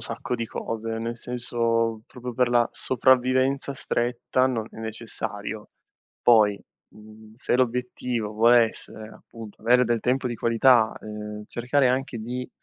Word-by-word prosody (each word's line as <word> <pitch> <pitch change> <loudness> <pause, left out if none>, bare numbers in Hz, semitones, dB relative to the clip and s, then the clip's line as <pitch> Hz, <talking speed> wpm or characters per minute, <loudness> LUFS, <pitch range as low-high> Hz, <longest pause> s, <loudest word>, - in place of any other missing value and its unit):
sacco 125 - -4
di 115 - -3
cose, 115 0 -4
nel 115 +1 -4
senso 115 -2 -1
proprio 125 -1 -8
per 125 +1 +2
la 120 -1 +3
sopravvivenza 130 +2 +2
stretta 125 +1 0
non 115 -4 -2
è - - -15
necessario. 110 -1 -6 0.5
Poi, 105 -4 +5 0.4
mhmm, 110 0 -15
se 125 - 0
l'obiettivo 125 -2 -1
vuole 115 +1 +5
essere, 110 0 -8
appunto, 110 -1 -12
avere 125 +2 +4
del 120 -1 +1
tempo 125 +2 0
di 120 - -4
qualità, 115 0 +4
ehm, 105 0 -7
cercare 125 +3 +1
anche 130 -2 -1
di, 125 +3 -5
120 Hz, 140 wpm, -25 LUFS, 110-125 Hz, 0.5 s, Poi